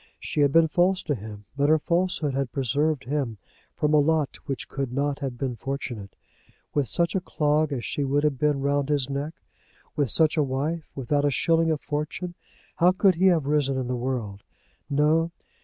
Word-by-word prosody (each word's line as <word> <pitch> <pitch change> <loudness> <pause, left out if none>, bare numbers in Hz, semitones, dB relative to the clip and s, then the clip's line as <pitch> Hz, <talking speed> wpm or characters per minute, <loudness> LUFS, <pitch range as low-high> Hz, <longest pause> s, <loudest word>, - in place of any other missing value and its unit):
She 150 - -2
had 140 -1 +4
been 165 +2 +5
false 180 +3 +2
to 150 - 0
him; 105 -3 -8
but 145 +1 +2
her 155 - +6
falsehood 170 -2 0
had 135 -2 -1
preserved 140 +3 0
him 130 -5 -2 0.4
from 150 0 +1
a 150 - +6
lot 155 -1 +1
which 135 -3 -3
could 135 -2 -3
not 140 +2 -1
have 135 -4 -4
been 125 -1 -2
fortunate. 120 -6 -5 0.6
With 145 -3 +1
such 170 +7 +1
a 190 - +1
clog 150 -2 +1
as 125 -4 -3
she 145 - -1
would 140 +2 +1
have 145 -4 +1
been 150 -2 +1
round 140 0 0
his 140 -2 0
neck, 145 +4 -4 0.5
with 145 -5 +1
such 160 +6 +3
a 150 - +4
wife, 145 +5 -2
without 145 +2 0
a 145 - +3
shilling 165 +4 +2
of 155 -2 0
fortune, 155 +4 -4 0.4
how 175 +2 +5
could 190 0 +4
he 185 +3 +3
have 165 -6 +3
risen 140 -2 +1
in 130 - -1
the 125 - -1
world? 120 -5 -3 0.5
No! 155 +3 +3
145 Hz, 195 wpm, -25 LUFS, 135-155 Hz, 0.6 s, her